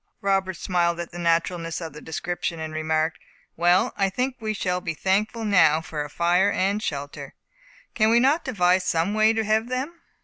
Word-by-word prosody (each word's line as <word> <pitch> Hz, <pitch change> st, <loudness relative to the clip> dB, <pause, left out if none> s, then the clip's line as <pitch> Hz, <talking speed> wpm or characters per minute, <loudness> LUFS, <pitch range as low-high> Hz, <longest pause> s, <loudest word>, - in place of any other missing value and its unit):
Robert 195 Hz, -1 st, 0 dB
smiled 170 Hz, -1 st, 0 dB
at 170 Hz, -, -5 dB
the 175 Hz, -, -8 dB
naturalness 165 Hz, 0 st, 0 dB
of 165 Hz, -4 st, -7 dB
the 150 Hz, -, -10 dB
description, 170 Hz, +1 st, -4 dB
and 160 Hz, 0 st, -5 dB
remarked, 155 Hz, +1 st, -1 dB, 0.4 s
"Well, 175 Hz, +2 st, +3 dB
I 195 Hz, -1 st, +1 dB
think 255 Hz, +6 st, -2 dB
we 220 Hz, -1 st, -2 dB
shall 180 Hz, -2 st, -1 dB
be 165 Hz, -, -4 dB
thankful 210 Hz, +6 st, 0 dB
now 160 Hz, -7 st, +4 dB
for 155 Hz, -2 st, -5 dB
a 145 Hz, -, -8 dB
fire 175 Hz, +5 st, +2 dB
and 200 Hz, +3 st, 0 dB
shelter. 145 Hz, -7 st, -5 dB, 0.6 s
Can 215 Hz, 0 st, +3 dB
we 230 Hz, +1 st, +5 dB
not 280 Hz, +7 st, +3 dB
devise 185 Hz, -7 st, +2 dB
some 170 Hz, +5 st, 0 dB
way 215 Hz, +1 st, +4 dB
to 225 Hz, 0 st, 0 dB
have 220 Hz, +2 st, +1 dB
them?" 280 Hz, +7 st, -4 dB
180 Hz, 190 wpm, -24 LUFS, 165-215 Hz, 0.6 s, we